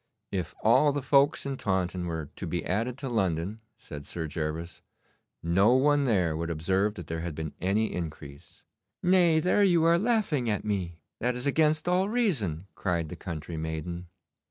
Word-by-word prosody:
'If 95 -3 -3
all 145 +7 +5
the 140 -1 -3
folks 140 +2 +3
in 135 -1 -3
Taunton 95 -4 -1
were 80 -3 -4
to - - -5
be - - -2
added 115 +7 -1
to 140 - -5
London,' 100 -2 -1 0.2
said 75 -10 -9
Sir 85 -2 -4
Gervas, 80 +2 -4 0.6
'no 95 +8 +4
one 145 +1 +3
there 90 -10 +2
would 85 +1 -3
observe 95 +6 0
that 85 - -7
there 80 +2 -4
had 85 -2 -4
been 80 -1 -5
any 105 +4 +1
increase.' 75 -4 -8 0.4
'Nay, 175 -3 +4
there 180 +5 +3
you 175 -4 +4
are 170 +1 +5
laughing 195 - +1
at 105 - -1
me. 90 -5 -3 0.2
That 125 +1 0
is 125 +2 -4
against 155 +2 +2
all 185 +2 +2
reason,' 130 - 0
cried 85 -4 -1
the - - -6
country 85 -2 -6
maiden. 80 +3 -4
100 Hz, 175 wpm, -28 LUFS, -, 0.6 s, all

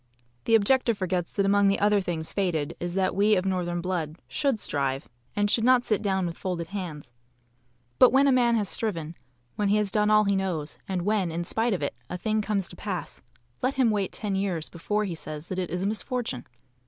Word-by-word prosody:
The 225 - +5
objector 235 +2 +3
forgets 185 -3 -2
that 200 - +1
among 200 0 +4
the 195 - +3
other 205 0 +3
things 165 -3 -3
fated 170 -6 -1
is 175 0 -4
that 190 -1 +1
we 210 +2 +4
of 185 0 0
northern 175 -2 -1
blood 170 -4 -2
SHOULD 275 -6 0
strive 135 -4 -1 0.3
and 205 0 +2
should 220 +2 +2
NOT 250 0 +5
sit 215 -4 0
down 190 -3 0
with 170 -1 -5
folded 175 -3 -3
hands. 165 -10 -6 0.9
But 255 - +8
when 270 +2 +5
a - - +5
man 240 -2 +4
has 210 -3 +1
striven, 170 -9 -1 0.4
when 210 - +1
he 205 +2 +3
has 210 -2 +1
done 210 0 +2
all 215 0 +6
he 200 -1 +1
knows, 175 -6 -2
and 185 -2 -2
when, 200 -3 +1
in 170 +1 -2
spite 225 +6 +1
of 170 - -4
it, 140 - -1 0.2
a 180 - -3
thing 215 +4 0
comes 200 -3 -1
to - - -9
pass, 185 -2 -5 0.4
let 260 +2 0
him 255 -4 +3
wait 200 -3 -1
ten 210 -3 -3
years 190 -5 -1
before 210 +5 -1
he 185 - -3
says 155 0 -6
that 185 - -2
it 180 - -2
is 180 +2 -2
a - - 0
misfortune. 220 - -2
195 Hz, 220 wpm, -26 LUFS, 175-215 Hz, 0.9 s, But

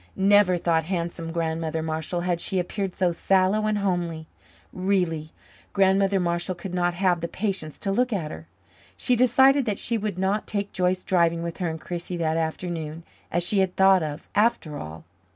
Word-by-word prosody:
Never, 195 -1 +4
thought 165 -2 +1
handsome 170 -2 -3
Grandmother 160 -1 -2
Marshall, 160 +2 -3
had 175 -1 -1
she 190 - -2
appeared 185 +1 -2
so 180 -2 +2
sallow 190 +4 +2
and 215 -1 +1
homely. 175 -5 -1 0.5
Really, 180 -5 0 0.4
Grandmother 195 0 +3
Marshall 175 +1 -1
could 175 +1 -7
not 175 -1 0
have 180 -2 +1
the 170 - -2
patience 190 -5 -3
to 195 - -2
look 245 +5 +1
at 175 -8 -2
her. 80 0 -9 0.5
She 250 - +1
decided 265 +3 +5
that 210 -4 -1
she 230 -1 -1
would 205 -3 -3
not 195 +3 0
take 200 -1 -3
Joyce 185 0 0
driving 170 -2 +2
with 170 -1 -5
her 180 -3 -1
and 160 0 -5
Chrissie 175 +1 -5
that 160 -1 0
afternoon, 165 -1 -3 0.3
as 175 +1 +1
she 195 +3 +1
had 190 -1 +1
thought 190 -1 +5
of, 155 0 -5
after 210 -8 +1
all. 80 +1 -8
180 Hz, 180 wpm, -25 LUFS, 165-195 Hz, 0.5 s, decided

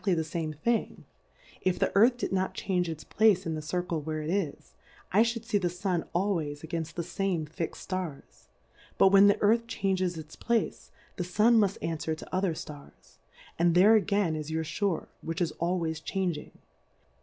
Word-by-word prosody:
1$ - - -18
exaflly 190 -3 +3
the 160 - 0
fame 160 0 -3
Thing; 225 +10 -1 0.6
if 185 -1 +1
the - - +1
Earth 235 +5 +5
did - - -3
not 190 0 0
change 180 -3 -1
its 155 -1 -6
place 205 -1 +3
in 165 - -2
the 155 - -3
Circle 170 0 -2
where 155 +1 -4
it 155 - -2
is, 185 -7 -3 0.4
I 205 - +6
Ihould 230 0 0
fee 210 -3 +1
the 180 -2 0
Sun 180 -1 -2
always 170 -6 -1
againft 160 0 -4
the 170 - -2
fame 175 -1 -1
fixM 160 +2 -5
Stars; 185 -7 -6 0.5
but 195 - +6
when, 195 +1 +7
the 205 - +3
Earth 230 +3 +3
changes 185 -5 -1
its 155 0 -9
place, 235 -2 -1 0.3
the 180 - -1
Sun 215 +6 +4
muft 200 -2 +2
anfwer 160 -1 -2
to 185 - -7
other 185 -3 +1
Stars, 145 -2 -11 0.4
and 170 0 +3
there 200 +5 +7
again 200 -5 +2
is 155 0 -5
your 160 0 -1
Shore 165 +2 -2
which 165 +2 -4
is 175 -3 0
always 170 -2 -1
changing. 175 -3 -3
180 Hz, 190 wpm, -29 LUFS, 160-200 Hz, 0.6 s, when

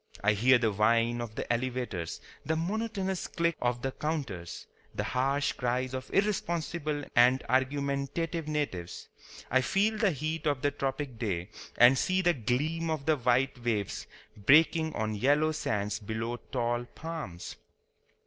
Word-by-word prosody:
I 100 +1 +4
hear 125 +5 +5
the 115 -2 +1
whine 115 +3 +2
of 110 -2 -6
the - - -3
elevators, 120 -8 -3 0.2
the 160 - 0
monotonous 190 +1 -2
click 170 -1 0
of 120 0 0
the 135 - -1
counters, 130 - -4 0.3
the - - -1
harsh 135 +3 +1
cries 125 +1 -1
of 130 0 -5
irresponsible 170 -6 -1
and 125 +2 +5
argumentative 140 +5 -1
natives. 145 - -3 0.4
I 130 +1 +4
feel 210 +9 +1
the 210 - +4
heat 155 0 -2
of 145 -3 0
the 145 - +3
tropic 135 -3 -3
day, 95 -7 -2 0.3
and 120 +2 +8
see 185 0 +1
the 175 -1 +4
gleam 150 +7 -1
of 155 -3 -2
the 155 0 +4
white 125 -1 +1
waves 105 -5 -2 0.3
breaking 160 - +4
on 110 0 -1
yellow 145 +8 +3
sands 105 -8 -2
below 110 +3 -3
tall 120 -1 0
palms. 150 - -7
130 Hz, 145 wpm, -30 LUFS, 120-155 Hz, 0.4 s, and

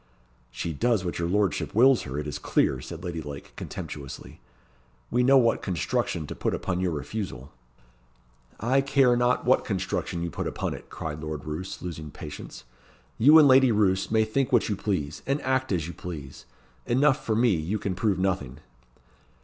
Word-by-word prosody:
"She 65 +8 -4
does 110 - +1
what 85 - -3
your 85 - 0
lordship 100 0 0
wills 130 +2 +6
her, 70 - -4
it 75 - -3
is 75 - -4
clear," 65 - +1
said 85 +4 -8
Lady 85 -3 -4
Lake, 70 -2 -9
contemptuously. 70 -3 -8 0.7
"We 125 - +2
know 135 +2 +6
what 115 -3 +3
construction 85 -3 -1
to - - -6
put - - -1
upon 90 -1 -2
your 90 -1 +1
refusal." 75 - -5 1.1
"I 130 +5 +2
care 135 -3 +3
not 120 +1 +1
what 130 +2 +4
construction 95 -4 -2
you 85 - -3
put - - -3
upon - - -3
it," - - -10
cried 75 -1 -5
Lord 75 -2 -5
Roos, 80 +5 -5
losing 80 -4 -6
patience. 75 +1 -9 0.6
"You 150 +7 +8
and 155 -2 +8
Lady 130 -1 +6
Roos 100 -3 +2
may 110 0 +3
think 130 +5 0
what 120 -3 +3
you 105 - 0
please, 90 -8 -3
and 135 +2 +1
act 130 -1 0
as 85 -5 0
you 85 - -6
please. 75 -7 -8 0.4
Enough 135 +3 +3
for 110 - 0
me, 120 +1 +4
you 85 +4 -1
can 100 -2 -3
prove 100 0 0
nothing." 90 -9 -1
95 Hz, 180 wpm, -26 LUFS, 80-120 Hz, 1.1 s, You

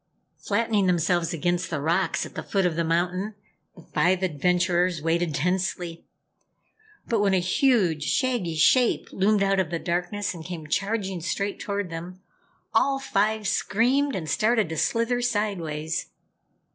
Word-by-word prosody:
Flattening 210 -2 +1
themselves 175 -1 +1
against 175 +2 -1
the 155 - -2
rocks 170 +6 0
at - - -11
the - - -4
foot 195 -2 0
of 175 -3 +1
the 170 - 0
mountain, 180 +5 -1 0.4
the 175 - -14
five 185 +3 +1
adventurers 180 +1 +1
waited 165 0 0
tensely. 175 +1 -2 1.0
But 230 - +1
when 200 -2 +3
a - - +3
huge, 180 - +2
shaggy 240 - 0
shape 240 +10 +3
loomed 200 +1 +2
out 195 0 +2
of 185 - 0
the 170 - -2
darkness 180 +4 -2
and 165 -2 -9
came 170 -2 -7
charging 195 +2 -2
straight 200 +4 -2
toward 200 -3 -3
them, 175 +3 -7 0.5
all 275 -1 +3
five 220 -5 0
screamed 260 +9 +1
and 170 -5 -4
started 215 0 +2
to 160 - -4
slither 230 +5 +1
sideways. 175 -9 -2
185 Hz, 145 wpm, -25 LUFS, 170-210 Hz, 1.0 s, when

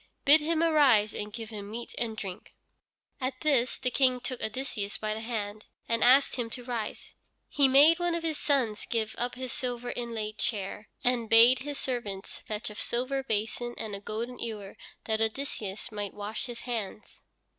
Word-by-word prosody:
Bid 295 +3 +8
him 325 +1 +1
arise, 275 -10 +5
and 210 0 -4
give 225 +1 -7
him 205 -2 -7
meat 235 +2 -6
and 225 -2 -2
drink." 190 -4 -7 0.6
At 255 -1 -3
this 265 -5 +2
the 250 - -1
King 255 -1 +3
took 250 0 -4
Odysseus 220 -3 -3
by 215 0 -2
the 215 - -4
hand 215 -2 -4 0.2
and 230 0 +2
asked 265 +2 +6
him 235 -2 -2
to 245 - -9
rise. 235 -3 -4 0.3
He 280 -2 +4
made 290 +6 +7
one 350 -1 +1
of 335 - -3
his 320 -2 -2
sons 250 -7 +1
give 220 -2 0
up 245 +1 -1
his 255 -1 -5
silver 245 -3 -3
inlaid 225 -3 -4
chair, 210 0 -2
and 240 -2 +1
bade 230 +3 +7
his 290 +2 -5
servants 210 -7 -4
fetch 215 0 -3
a - - -10
silver 255 +5 -1
basin 235 0 -2
and 215 -2 -4
a - - -6
golden 230 +4 -5
ewer 210 -4 -5 0.3
that 220 0 0
Odysseus 220 -4 -3
might 205 -2 -5
wash 210 +4 -4
his 240 -1 -7
hands. 220 -4 -5
235 Hz, 180 wpm, -29 LUFS, 215-260 Hz, 0.6 s, Bid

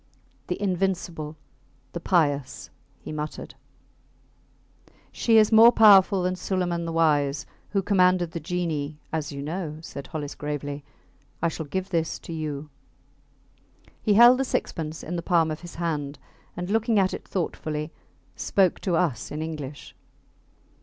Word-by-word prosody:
The - - -3
Invincible, 180 -5 -2 0.5
the 170 - -5
Pious, 145 -6 0 0.3
he - - -8
muttered. 150 0 -5 1.6
She 225 -1 +3
is 215 0 +5
more 225 +2 +9
powerful 200 -4 +6
than 185 0 0
Suleiman 180 -2 -2
the 165 - -3
Wise, 150 -3 +2 0.2
who 195 -2 0
commanded 180 -3 +3
the 170 - -4
genii, 155 -3 -3 0.2
as 155 -2 -2
you 140 0 -6
know, 155 0 -4
said 140 -3 -8
Hollis, 150 -2 -5
gravely. 145 -1 -5 0.6
I 170 - +1
shall 160 -1 -6
give 190 +6 -3
this 165 -2 0
to 165 - -9
you. 150 -2 -5 1.3
He 210 -2 +2
held 240 +3 +8
the - - +2
sixpence 160 -10 -3
in 175 +3 -4
the - - -2
palm 165 -2 +2
of 155 - -4
his 175 -1 -10
hand, 150 -4 -3 0.4
and 180 +2 -4
looking 225 0 +2
at 190 -1 +3
it - - -7
thoughtfully, 155 -4 -3 0.4
spoke 190 -3 +1
to 180 -3 0
us 160 -8 0
in 150 +1 -4
English. 150 -3 -7
165 Hz, 145 wpm, -25 LUFS, 150-185 Hz, 1.6 s, more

